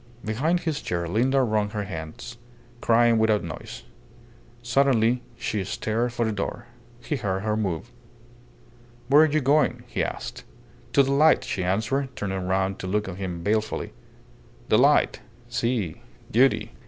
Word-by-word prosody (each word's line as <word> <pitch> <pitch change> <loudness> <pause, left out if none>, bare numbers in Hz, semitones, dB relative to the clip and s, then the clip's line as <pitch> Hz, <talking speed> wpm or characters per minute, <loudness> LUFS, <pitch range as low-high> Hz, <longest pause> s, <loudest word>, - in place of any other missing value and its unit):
Behind 150 +12 0
his 155 -3 -2
chair 85 -1 -2
Linda 130 +9 +2
wrung 105 -3 +1
her 105 0 -3
hands, 90 +6 -7 0.4
crying 115 0 +4
without 110 -2 +2
noise. 85 - -8 0.8
Suddenly 120 -1 +2 0.2
she 105 -3 -2
started 110 +5 -1
for 120 -1 -1
the 110 - 0
door. 105 -2 -4 0.4
He 150 - -2
heard 95 -5 -2
her 105 0 0
move. 105 +1 -3 1.2
"Where 145 +2 +7
are 155 -1 +4
you 155 +1 +2
going?" 145 +3 +2
he - - -2
asked. - - -5 0.5
"To 140 - +6
the 135 - -1
light," 155 +3 +5
she 95 - -3
answered, 115 +9 -1
turning 95 -2 -3
round 95 +1 0
to 95 - -5
look 105 +2 0
at 95 -1 -6
him 90 -3 -5
balefully. 110 +2 -1 0.8
"The - - +5
light! - - +4 0.3
Si 115 -8 -1 0.3
duty." 130 +4 +3
110 Hz, 150 wpm, -25 LUFS, 95-130 Hz, 1.2 s, Where